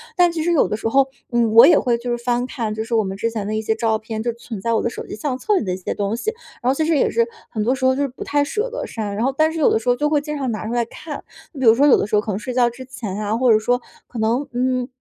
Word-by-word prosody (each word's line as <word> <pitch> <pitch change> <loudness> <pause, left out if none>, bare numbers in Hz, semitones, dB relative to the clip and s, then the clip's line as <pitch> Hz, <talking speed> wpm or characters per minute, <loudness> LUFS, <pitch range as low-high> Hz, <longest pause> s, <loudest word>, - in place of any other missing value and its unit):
但 355 -2 +4
其 330 - -3
实 345 - +1
有 310 - +3
的 - - -2
时 225 - -3
候， 270 +3 +4 0.2
嗯， 235 -2 +2
我 230 - +9
也 335 - +6
会 240 -2 +1
就 240 +1 -6
是 240 - 0
翻 245 0 0
看 225 -4 -3
就 220 +1 -3
是 230 +1 -2
我 220 - +3
们 190 0 -4
之 230 +3 0
前 220 -3 -4
的 215 - -3
一 220 - -1
些 220 0 0
照 225 -1 +1
片， 220 0 -5
就 235 - 0
存 230 -3 -8
在 230 +3 0
我 225 - +2
的 - - 0
手 - - -7
机 - - -7
相 255 +3 -3
册 420 +7 +1
里 - - 0
的 185 - -1
一 185 - -3
些 185 - -4
东 205 +2 -2
西， 435 - -2 0.3
然 250 - +1
后 - - +2
其 310 +3 0
实 325 0 +2
也 - - +2
是 230 0 +1 0.2
很 215 - -3
多 250 +5 +2
时 260 - -8
候 260 - +5
就 280 - -1
是 285 - +1
不 255 - -8
太 290 0 +1
舍 425 +11 -2
得 - - -4
删， 210 -3 -4
然 220 - -1
后 265 - +1
但 315 0 +3
是 325 - -4
有 - - +4
的 - - +2
时 225 - -12
候 245 - +4
就 295 +3 0
会 295 -2 +2
经 300 0 -5
常 265 -3 -2
拿 215 -1 -4
出 230 - -3
来 240 -1 +1
看。 300 +5 -8 0.3
比 265 -3 -3
如 225 - +7
说 275 +4 +4
有 - - +7
的 - - -1
时 210 - 0
候 210 - +4
可 215 - -4
能 195 - -2
睡 250 +3 -5
觉 240 -1 +3
之 245 +2 -10
前 215 -6 -6
呀， 210 +1 -1
或 250 -1 +4
者 215 - +5
说 245 +3 0 0.3
可 245 - -10
能 235 +6 0
嗯， 255 0 0
240 Hz, 375 characters per minute, -21 LUFS, 220-270 Hz, 0.3 s, 我